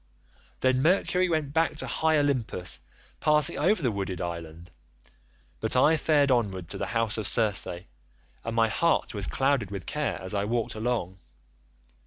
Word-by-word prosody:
"Then 130 0 +2
Mercury 180 +2 +2
went 155 -4 -1
back 160 -1 +1
to - - -2
high 160 -1 +1
Olympus 130 -11 -1 0.4
passing 150 -2 +2
over 180 +3 +2
the 125 - +1
wooded 95 -3 -4
island; 85 -1 -7 0.9
but 110 - +1
I 150 +5 +5
fared 150 -3 +2
onward 95 -8 -1
to - - -6
the - - -2
house 115 -1 0
of 105 - +2
Circe, 110 -4 +4
and 85 - -10
my 115 -1 +3
heart 165 +8 0
was 100 -3 -2
clouded 135 -7 0
with 100 -3 -7
care 150 -1 -2
as 95 +2 -7
I 100 0 0
walked 115 +1 -2
along. 110 -5 -3
115 Hz, 160 wpm, -27 LUFS, 100-150 Hz, 0.9 s, I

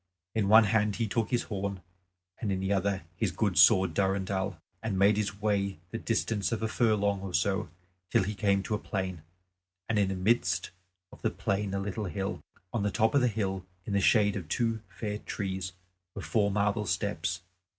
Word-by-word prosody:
In 110 -3 +1
one 110 +2 +9
hand 105 0 +2
he 115 - 0
took 110 0 0
his 120 - +1
horn, 100 -2 -3 0.6
and 105 - -1
in 95 - 0
the 95 +1 0
other 95 -1 0
his - - 0
good - - 0
sword 95 0 +6
Durendal, 95 -1 0 0.2
and 105 -3 -2
made 100 +2 +5
his 100 -1 -2
way 100 -3 0
the 115 - -3
distance 115 -3 0
of 115 -1 -2
a - - +2
furlong 105 -4 +1
or 95 -2 -4
so 95 +1 +1 0.4
till - - +3
he 105 +3 -2
came 100 -1 +1
to 110 - -3
a 105 - 0
plain, 95 -4 -3 0.7
and 110 -2 +1
in 100 - +3
the 95 - -2
midst 90 -3 +1 0.4
of - - -15
the - - +2
plain 100 0 -1
a - - 0
little 100 +2 -3
hill. 95 +2 -3 0.3
On 115 - 0
the 105 - +1
top 110 +2 +2
of 140 - +4
the 125 - +4
hill 95 -4 -2 0.2
in 105 - -3
the 100 - +3
shade 105 -1 +4
of 90 -6 -5
two 115 +5 0
fair 105 -2 -4
trees 95 -3 -4 0.4
were - - -5
four 105 -3 +2
marble 105 +1 0
steps. 90 0 -1
100 Hz, 200 wpm, -29 LUFS, 95-110 Hz, 0.7 s, one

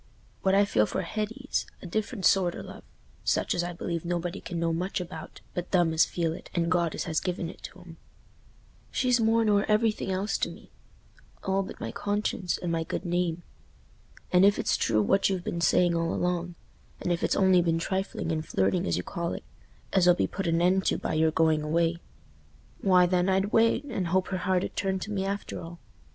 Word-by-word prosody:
What 190 0 +3
I 200 +1 +5
feel 105 - +2
for 190 - -2
Hetty's 220 +8 -3
a - - -11
different 205 +2 -2
sort 180 -3 +4
o' - - -6
love, - - -10 0.4
such - - +1
as 175 - 0
I 175 - -3
believe 170 -1 -4
nobody 175 +2 -3
can 175 -2 -5
know 165 0 0
much 180 +4 -2
about 170 -3 -8
but 180 0 -4
them 175 -3 +3
as 160 - +5
feel 165 -2 -1
it 170 - -10
and 170 0 +1
God 170 -3 +1
as - - -2
has 160 -2 0
given 180 -2 -3
it - - -18
to 185 - -10
'em. 170 -2 -13 0.9
She's 250 -1 +2
more 225 0 +3
nor 205 -1 +3
everything 215 -1 +1
else 190 +3 -1
to - - 0
me, - - -13 0.7
all 195 0 +1
but 190 - -8
my - - -4
conscience 205 -3 -1
and 175 - -3
my 165 -1 0
good 185 - -4
name. 175 -1 -1 0.9
And 180 +1 +5
if 200 +1 +5
it's - - +1
true 110 -2 +2
what 195 - +3
you've 185 -2 -2
been 170 - -3
saying 175 0 +4
all 165 0 0
along—and 175 0 -4
if 170 - -3
it's - - +1
only 190 -2 +5
been 165 -1 +1
trifling 190 0 -2
and 155 -1 -1
flirting 95 - 0
as 85 - +1
you 90 - -2
call 170 - -3
it, - - -6 0.5
as 185 -2 +4
'll 175 - +7
be - - +1
put 195 -2 -4
an 165 +1 +2
end 190 +2 +3
to - - +2
by - - -3
your 160 +1 +3
going 160 -1 +2
away—why, 170 +3 -1
then, 180 +1 +1
I'd 190 +2 +1
wait, 230 +4 +4
and 200 -11 -3
hope 185 +2 +1
her 185 - -1
heart 185 0 +1
'ud - - -5
turn 190 -1 0
to 195 +3 -6
me 195 -2 -1
after 200 +1 -4
all. 170 +1 -9
180 Hz, 210 wpm, -28 LUFS, 170-195 Hz, 0.9 s, ll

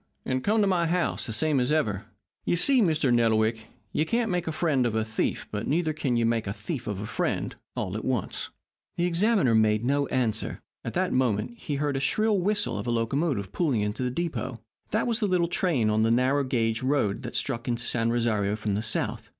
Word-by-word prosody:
And 130 0 -1
come 215 +2 +2
to - - +4
my 175 -3 +2
house, 175 +1 0
the - - -4
same 145 +5 +1
as 125 +3 +1
ever.' 110 -11 0 0.4
You - - +1
see, 255 +9 +4
Mr. 155 - +2
Nettlewick, 110 -1 +2 0.3
you 155 - +2
can't 230 +6 0
make 180 -1 -1
a - - 0
friend 150 -6 +1
of 110 - -2
a 110 0 +1
thief, 110 0 -2
but 105 +1 -3
neither 155 +1 +1
can 140 -5 -1
you 115 -1 +2
make 115 -2 0
a 100 - -2
thief 120 +4 -5
of 105 -2 -3
a - - -4
friend, - - -2 0.2
all 90 +1 -3
at 110 - -4
once." 125 -7 -2 0.5
The 175 - +2
examiner 180 - +3
made 110 0 +3
no 140 +2 +1
answer. 115 -4 -1 0.2
At - - -4
that - - +1
moment 130 - 0
was 145 - 0
heard 145 -1 0
the - - 0
shrill 210 +9 +2
whistle 205 +3 0
of - - -5
a - - +1
locomotive 115 - 0
pulling 140 -11 +1
into 105 +3 -2
the 125 - 0
depot. 150 -3 -3 0.3
That 215 - +1
was 235 -1 +1
the 210 - +1 0.2
train 140 - +1
on 110 +1 +2
the 110 - +3
little, 115 - +4
narrow 130 +3 +2
gauge 115 -3 0
road 130 -7 +1
that - - -7
struck 120 -3 -2
into 120 -1 -1
San 115 -1 +1
Rosario 110 -4 +1
from 105 -1 -2
the 105 - 0
south. 110 0 -1
130 Hz, 225 wpm, -27 LUFS, 110-165 Hz, 0.5 s, to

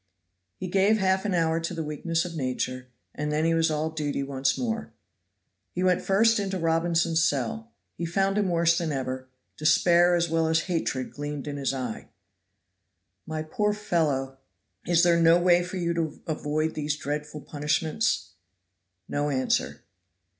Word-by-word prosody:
He 185 - -5
gave 195 +4 +3
half 190 -1 +1
an 200 -3 0
hour 165 -1 +2
to 170 +1 -4
the 165 - -3
weakness 165 +3 -1
of 170 -1 -6
nature, 130 -2 -3 0.3
and 150 0 -3
then 155 +1 +1
he 165 - +3
was 165 0 +2
all 155 +1 -1
duty 145 -3 -2
once 135 -1 0
more. 230 -2 -3 0.8
He 180 - -1
went 185 0 +3
first 225 +4 +3
into 195 -1 -2
Robinson's 165 0 +1
cell. 155 - -1 0.3
He 170 - -3
found 195 +3 +1
him 200 -3 +1
worse 170 -1 +3
than 165 -3 -2
ever: 130 -1 -3 0.3
despair 175 +3 +4
as 170 0 +1
well 165 0 +1
as 160 0 +2
hatred 160 -8 -2
gleamed 145 -1 -5
in 145 -1 -4
his 140 -1 0
eye. 125 -4 -5 1.2
"My 155 0 -3
poor 210 +6 0
fellow, 145 -10 -1 0.5
is 170 0 +4
there 170 -1 +4
no 165 +1 +6
way 175 0 +4
for 180 +2 -5
you 170 -1 0
to 165 -3 -2
avoid 155 -1 -1
these 150 -1 -2
dreadful 150 +1 -4
punishments?" 150 - -1 0.8
No 145 0 -1
answer. 130 -2 -1
165 Hz, 160 wpm, -26 LUFS, 145-175 Hz, 1.2 s, no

